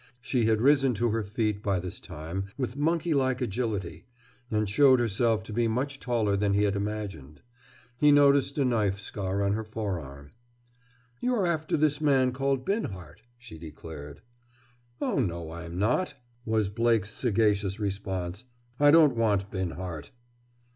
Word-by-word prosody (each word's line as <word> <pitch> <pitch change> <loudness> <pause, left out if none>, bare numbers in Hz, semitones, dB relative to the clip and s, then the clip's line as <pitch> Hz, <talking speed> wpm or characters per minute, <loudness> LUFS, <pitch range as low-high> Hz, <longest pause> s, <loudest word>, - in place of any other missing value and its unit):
She 125 -1 0
had 110 0 +2
risen 135 -3 +4
to 115 +2 +1
her 115 +1 0
feet 105 0 -2
by 100 -3 0
this 90 0 -6
time, 85 +6 -6
with 130 -2 -3
monkey 165 +3 +1
like 130 -3 +1
agility, 100 -8 -3 0.4
and 110 -2 0
showed 130 +5 +5
herself 115 -1 +1
to 110 - -9
be 115 +1 +1
much 135 +4 -2
taller 115 -5 0
than 100 0 +1
he 100 - +3
had 100 -1 +1
imagined. 100 -9 -5 0.5
He 150 +3 +5
noticed 140 -1 +4
a 140 - +2
knife 105 -5 +1
scar 100 -1 -3
on 100 0 +1
her 110 +1 -2
forearm. 85 -11 -6 0.9
"You're 245 -6 +1
after 160 -3 0
this 150 0 +1
man 135 -4 +3
called 135 0 -1
Binhart," 100 - -4 0.2
she 120 -9 -12
declared. 75 -2 -10 0.8
"Oh, - - 0
no, 85 -8 -2
I'm 85 +1 -7
not," 125 - 0 0.3
was 110 -2 +1
Blake's 115 -1 +1
sagacious 105 -3 +1
response. 95 -1 -3 0.4
"I 145 0 +6
don't 150 -4 +6
want 105 -4 +1
Binhart!" 90 -4 -5
110 Hz, 150 wpm, -28 LUFS, 95-130 Hz, 0.9 s, I